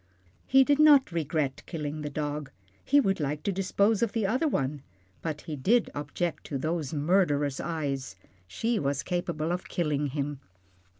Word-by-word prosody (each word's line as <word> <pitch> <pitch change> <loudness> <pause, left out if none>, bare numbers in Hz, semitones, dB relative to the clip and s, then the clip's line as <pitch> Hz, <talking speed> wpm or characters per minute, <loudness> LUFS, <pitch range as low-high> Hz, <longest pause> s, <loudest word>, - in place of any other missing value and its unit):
He 270 0 +6
did 285 +2 +2
not 290 -7 +7
regret 155 -4 -1
killing 155 -2 -4
the 150 - -3
dog, 145 0 -3 0.3
he 285 - +4
would 195 -9 +1
like 150 0 -2
to 200 - 0
dispose 200 +3 +1
of 230 -3 +1
the 225 -3 0
other 255 +10 +1
one, 140 - -1 0.4
but 155 -2 -4
he 155 - -5
did 220 - +2
object 150 +4 -3
to 140 - -3
those 155 0 -2
murderous 145 -3 +1
eyes. 140 - -3 0.3
She 225 - -1
was 140 0 -1
capable 170 -3 -2
of 180 +1 -3
killing 150 -4 0
him. 140 0 -3
155 Hz, 165 wpm, -28 LUFS, 145-195 Hz, 0.4 s, not